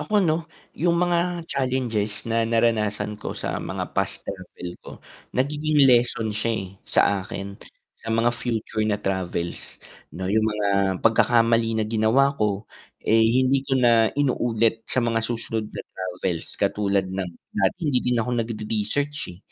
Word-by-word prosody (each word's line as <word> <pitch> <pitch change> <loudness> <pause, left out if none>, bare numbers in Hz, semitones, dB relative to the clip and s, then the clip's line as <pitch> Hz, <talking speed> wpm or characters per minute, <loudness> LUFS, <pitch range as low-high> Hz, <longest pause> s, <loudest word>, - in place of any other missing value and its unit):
Ako, 210 -3 +2
'no, 160 +1 0 0.2
'yung 170 +1 +1
mga 175 0 +1
challenges 125 -8 -1
na 115 0 0
naranasan 110 -2 +1
ko, - - -5
sa - - -3
mga - - -5
past - - -2
travel 90 - -7
ko, - - -11 0.5
nagiging 150 +2 +2
lesson 120 -3 +3
siya, 110 +2 -1
eh, 95 - -4 0.2
sa - - +3 0.2
akin, 100 +1 -7 0.4
sa 115 - -9
mga 115 +1 +2
future 115 -2 -3
na 105 - +2
travels, 95 -3 -3 0.4
'no, 95 +2 -2
'yung 110 +1 +3
mga 105 -1 -1 0.4
pagkakamali 115 0 +4
na 110 - +1
ginawa 115 +6 +3
ko, 105 0 0 0.4
eh, 115 +1 +4
hindi 130 +4 +3
ko 135 - +2
na 115 -3 +5
inuulit 115 -5 +1
sa 130 - +1
mga 115 -1 +1
susunod 115 -1 -3
na - - -7
travels. 90 -2 -4
Katulad 100 -1 +1
ng 95 -1 -2 0.2
dati 100 - +1
hindi 135 -5 +2
din 125 0 0
ako 120 +2 0
nagre-research, 115 +6 -2
eh, 90 - -10
115 Hz, 150 wpm, -24 LUFS, 105-130 Hz, 0.5 s, na